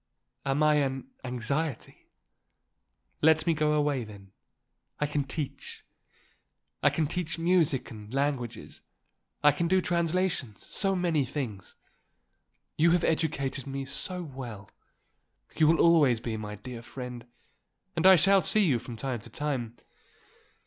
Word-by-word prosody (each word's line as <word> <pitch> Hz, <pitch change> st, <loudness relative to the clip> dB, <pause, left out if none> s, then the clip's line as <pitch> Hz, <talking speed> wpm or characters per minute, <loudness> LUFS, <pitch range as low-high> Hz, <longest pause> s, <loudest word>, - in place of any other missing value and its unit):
Am 135 Hz, +3 st, +2 dB
I 150 Hz, 0 st, +4 dB
an 140 Hz, -, -2 dB
anxiety? 130 Hz, +3 st, -3 dB, 1.1 s
Let 160 Hz, +1 st, +4 dB
me 170 Hz, -, +3 dB
go 150 Hz, -1 st, +1 dB
away, 145 Hz, -4 st, +1 dB
then. 100 Hz, -3 st, -12 dB, 0.7 s
I 150 Hz, -, +1 dB
can 145 Hz, -1 st, -1 dB
teach. 135 Hz, +1 st, -6 dB, 1.0 s
I 145 Hz, -, +5 dB
can 150 Hz, +3 st, 0 dB
teach 165 Hz, +1 st, -3 dB
music 165 Hz, -5 st, +2 dB
and 105 Hz, -1 st, -10 dB
languages. 135 Hz, -3 st, -3 dB, 0.6 s
I 150 Hz, -, +7 dB
can 170 Hz, +4 st, -1 dB
do 190 Hz, +2 st, +3 dB
translations, 170 Hz, -, -1 dB
so 195 Hz, -1 st, 0 dB
many 170 Hz, -5 st, +1 dB
things. 120 Hz, -7 st, -5 dB, 1.0 s
You 165 Hz, +2 st, +5 dB
have 175 Hz, -, +2 dB
educated 140 Hz, -4 st, -1 dB
me 135 Hz, 0 st, -4 dB
so 180 Hz, +7 st, -1 dB
well. 125 Hz, -, -8 dB, 0.8 s
You 155 Hz, -, +4 dB
will 165 Hz, +1 st, +4 dB
always 150 Hz, -8 st, +5 dB
be 115 Hz, -1 st, -4 dB
my 105 Hz, -1 st, -6 dB
dear 120 Hz, +3 st, -8 dB
friend 125 Hz, 0 st, -8 dB, 0.7 s
and 170 Hz, +2 st, +4 dB
I 190 Hz, -, +10 dB
shall 195 Hz, +3 st, +5 dB
see 195 Hz, +2 st, +4 dB
you 135 Hz, -8 st, +2 dB
from 120 Hz, -1 st, -9 dB
time 130 Hz, 0 st, -3 dB
to -, -, -12 dB
time. 125 Hz, -6 st, -3 dB
145 Hz, 135 wpm, -28 LUFS, 125-165 Hz, 1.1 s, I